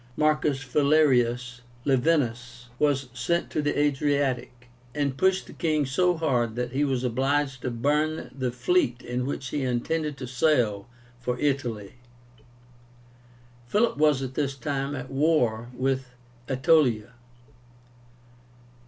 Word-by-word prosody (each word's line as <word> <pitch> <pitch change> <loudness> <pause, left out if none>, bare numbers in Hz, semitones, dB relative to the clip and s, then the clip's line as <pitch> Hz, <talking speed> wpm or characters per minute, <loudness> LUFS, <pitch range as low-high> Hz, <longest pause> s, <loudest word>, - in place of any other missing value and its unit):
Marcus 150 -3 +1
Valerius 125 -4 +2 0.2
Laevinus 125 -3 0
was 140 -3 +1
sent 170 +6 -1
to 155 - 0
the 145 0 -1
Adriatic, 140 -4 0 0.3
and 140 -3 0
pushed 190 +5 +2
the - - -12
king 155 -4 0
so 180 +6 +1
hard 125 -8 0
that 125 0 -3
he 135 +3 0
was 130 -3 0
obliged 135 +2 0
to 125 - -2
burn 150 +6 0
the 130 -2 -2
fleet 125 0 +1
in 125 +1 -3
which 135 -2 -4
he 145 - -2
intended 140 +4 -1
to 130 - -6
sail 120 -6 +1 0.3
for 125 0 -2
Italy. 125 -7 -2 1.7
Philip 220 - +2
was 150 -2 +3
at 130 -1 -5
this 140 -1 -1
time 140 0 -3
at 130 0 -7
war 130 -6 +1
with 130 0 0 0.4
Aetolia. 130 -5 +2
135 Hz, 125 wpm, -26 LUFS, 125-150 Hz, 1.7 s, was